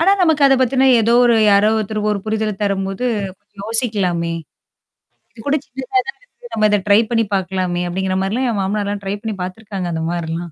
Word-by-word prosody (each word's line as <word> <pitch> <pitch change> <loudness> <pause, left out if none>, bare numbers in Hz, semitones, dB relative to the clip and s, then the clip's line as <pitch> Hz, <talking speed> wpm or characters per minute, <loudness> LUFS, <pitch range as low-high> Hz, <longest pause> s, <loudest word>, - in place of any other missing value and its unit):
ஆனா, 375 +4 +4
நமக்கு 320 -4 +3
அத 270 - +5
பத்தின 260 +1 +3
ஏதோ 225 +1 +2
ஒரு 240 -1 +4 0.2
யாரோ 200 +1 +4
ஒருத்தர் 215 0 -2
ஒரு 210 - 0
புரிதல 220 0 -1
தரும்போது 195 +2 -2 0.3
கொஞ்சம் 205 -1 -17
யோசிக்கலாமே. 200 -8 +1 1.0
"இது 225 - -19
கூட 285 - +2
சின்னதா 265 +9 -2
தான 470 - -6
இருக்கு. 485 -1 -16
நம்ம 215 -1 +3
இத 210 - +3
ட்ரை 205 +1 +6
பண்ணி 230 -1 +2
பார்க்கலாமே" 185 -2 -1
அப்படிங்கிற 185 +1 -2
மாரிலாம் 215 +7 -1
என் 220 -3 -1
மாமனார்லாம் 205 +1 -2
ட்ரை 195 +1 -2
பண்ணி 220 -1 -4
பார்த்துருக்காங்க 190 0 -5
அந்த 160 - -3
மாரிலாம். 170 0 -4
210 Hz, 185 wpm, -18 LUFS, 190-230 Hz, 1.0 s, ட்ரை